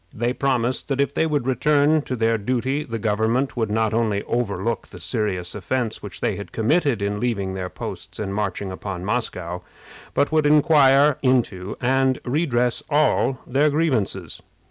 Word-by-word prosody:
They 120 +2 0
promised 130 -2 0
that 140 -1 -2
if 140 - +1
they 160 - +1
would 145 -5 -1
return 145 +4 +3
to 130 - 0
their 115 -1 +1
duty 130 +6 -1
the 115 -6 -5
government 110 +5 0
would 115 -3 -1
not 110 0 +1
only 110 -3 0
overlook 115 -2 -2
the - - -12
serious 100 -7 -2
offense 110 +3 -2
which 100 -2 -8
they - - 0
had 100 - -8
committed 130 - +1
in 100 0 -1
leaving 100 -6 -1
their 95 -1 -4
posts - - -7
and 100 -2 -3
marching 100 -1 -2
upon 95 -1 -6
Moscow, 90 -6 -2 0.5
but 145 - +2
would 155 -1 +3
inquire 145 -2 +5
into 115 -8 0
and 130 +1 +2
redress 125 -3 +1
all 145 -3 +2
their 140 +4 +2
grievances. 115 - -1
120 Hz, 165 wpm, -22 LUFS, 105-135 Hz, 0.5 s, inquire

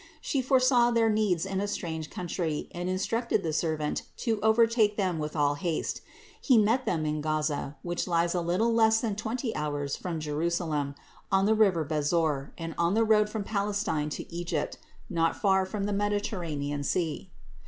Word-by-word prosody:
She 275 -3 -1
foresaw 255 -2 +4
their 230 -2 +3
needs 205 -5 +1
in 195 0 -2
a 205 - -1
strange 160 -6 -4
country 170 -3 -3
and 175 +1 -4
instructed 215 +3 0
the 160 -2 -1
servant 155 -1 -1 0.2
to 225 -3 -1
overtake 220 -1 +3
them 185 -5 0
with 150 +1 -4
all 145 -1 +2
haste. 160 +2 -2 0.4
He 255 -5 +4
met 225 +5 +3
them 160 -3 0
in 150 0 -1
Gaza, 150 -2 -1
which 175 +1 -2
lies 170 -1 +1
a 180 - 0
little 185 +8 +1
less 220 -1 +4
than 220 -4 -2
twenty 225 +3 -3
hours 145 -2 -2
from 170 -3 -4
Jerusalem, 155 -1 -1 0.4
on 195 0 +4
the 215 - +4
river 195 -7 +3
Besor, 150 -1 0
and 165 -1 -5
on 170 +3 +2
the 225 - +4
road 210 -1 +4
from 215 -1 -3
Palestine 200 -7 -1
to - - -9
Egypt, 170 -3 -3 0.3
not 165 -1 0
far 190 -2 +3
from 200 +1 -3
the 205 +1 -1
Mediterranean 180 -9 -2
sea. 155 - -1
180 Hz, 175 wpm, -28 LUFS, 155-215 Hz, 0.4 s, foresaw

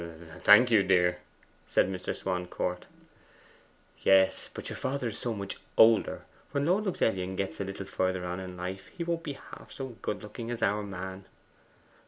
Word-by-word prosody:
'Thank 120 +4 +8
you, 110 -3 +6
dear,' 90 -2 +3 0.5
said - - +3
Mr. 90 -1 -3
Swancourt. 90 -1 -3 1.2
'Yes; 95 -1 +4
but - - -7
your - - -5
father 130 -3 -2
is 105 - -5
so 120 - -1
much 100 -3 -4 0.2
older. 110 0 +5 0.3
When 140 0 +1
Lord 190 +6 +2
Luxellian 95 - 0
gets 95 -4 -3
a - - 0
little 95 0 -6
further 95 -1 -1
on 90 +1 -3
in 90 -1 -7
life, 95 +2 -5
he 170 - -6
won't 170 0 -1
be 150 -4 -4
half - - -12
so 135 -1 -5
good 105 - -3
looking 115 +2 -7
as 120 -1 -3
our 105 +1 +2
man. 95 -1 -6
95 Hz, 170 wpm, -29 LUFS, 95-115 Hz, 1.2 s, Thank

